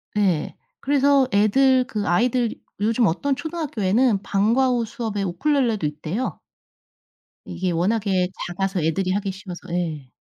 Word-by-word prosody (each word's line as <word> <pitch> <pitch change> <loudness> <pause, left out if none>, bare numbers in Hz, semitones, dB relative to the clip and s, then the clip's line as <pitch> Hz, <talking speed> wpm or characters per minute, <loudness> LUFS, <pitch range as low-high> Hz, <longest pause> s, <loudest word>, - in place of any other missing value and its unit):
네. 185 -7 +1 0.2
그래서 280 -1 +3
애들 255 +5 +4
그 210 -5 -3
아이들 235 +5 +2 0.3
요즘 225 +2 +2
어떤 270 - 0
초등학교에는 255 - 0
방과 225 +7 +2
후 240 -2 +1
수업에 220 -4 -4
우쿨렐레도 220 - 0
있대요. 155 +11 -3 1.1
이게 185 -1 -3
워낙에 190 +1 +1 0.2
작아서 190 +1 -2
애들이 180 +4 0
하기 195 0 -1
쉬워서 185 -2 -9
예. 155 -7 -3
210 Hz, 300 characters per minute, -23 LUFS, 185-255 Hz, 1.1 s, 애들